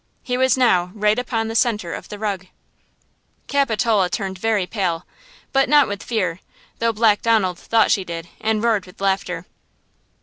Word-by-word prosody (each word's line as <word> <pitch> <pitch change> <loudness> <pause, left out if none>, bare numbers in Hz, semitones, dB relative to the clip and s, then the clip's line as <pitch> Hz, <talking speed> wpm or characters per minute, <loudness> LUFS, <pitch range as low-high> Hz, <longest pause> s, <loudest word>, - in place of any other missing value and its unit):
He 250 - -2
was 260 0 +3
now 185 -9 +3
right 210 +2 +2
upon 230 -3 -2
the 225 - -4
center 215 -8 +1
of - - -8
the 210 - -7
rug 200 -3 -3 1.0
Capitola 225 -8 +1
turned 190 0 -4
very 215 -3 +1
pale, 180 -4 -2 0.5
but 270 -1 +3
not 295 -3 +6
with 200 -1 -5
fear, 185 -7 -2 0.4
though 230 0 +2
Black 215 -1 +3
Donald 205 -6 +2
thought 225 -1 +2
she 195 - +2
did, 170 -1 -6
and 220 0 0
roared 220 -5 +1
with 180 - -16
laughter. 195 0 -1
215 Hz, 165 wpm, -21 LUFS, 190-230 Hz, 1.0 s, not